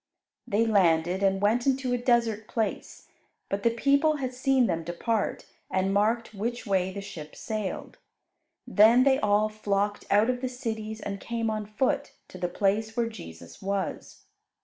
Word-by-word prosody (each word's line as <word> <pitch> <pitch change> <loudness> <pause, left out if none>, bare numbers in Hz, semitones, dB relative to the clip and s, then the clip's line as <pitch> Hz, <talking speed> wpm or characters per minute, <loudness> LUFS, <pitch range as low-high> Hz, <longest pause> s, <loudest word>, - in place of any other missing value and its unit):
They 215 +3 +2
landed, 180 -4 +2
and 195 -1 +2
went 235 +5 +2
into 265 -2 +1
a - - +2
desert 235 -3 +1
place; 220 -2 -3 0.4
but 200 +1 -2
the 235 - +3
people 280 +6 +2
had 260 -3 -3
seen 265 0 +2
them 165 -6 -1
depart, 195 +6 -2 0.2
and 190 +1 0
marked 220 +3 +1
which 235 +5 -3
way 190 -2 +1
the 200 +1 -6
ship 155 -6 -9
sailed. 215 -3 -5 0.7
Then 225 +4 +6
they 270 0 +4
all 210 +1 +3
flocked 205 -1 -1
out 205 +2 +4
of 250 0 -5
the 255 - -2
cities 220 -3 -5
and 200 -1 -5
came 230 0 -2
on 215 -1 -3
foot 270 +7 -1 0.2
to 185 - -10
the 175 -1 -1
place 210 +5 0
where 235 -1 +2
Jesus 80 - -11
was. 195 -2 -4
215 Hz, 165 wpm, -27 LUFS, 195-240 Hz, 0.7 s, Then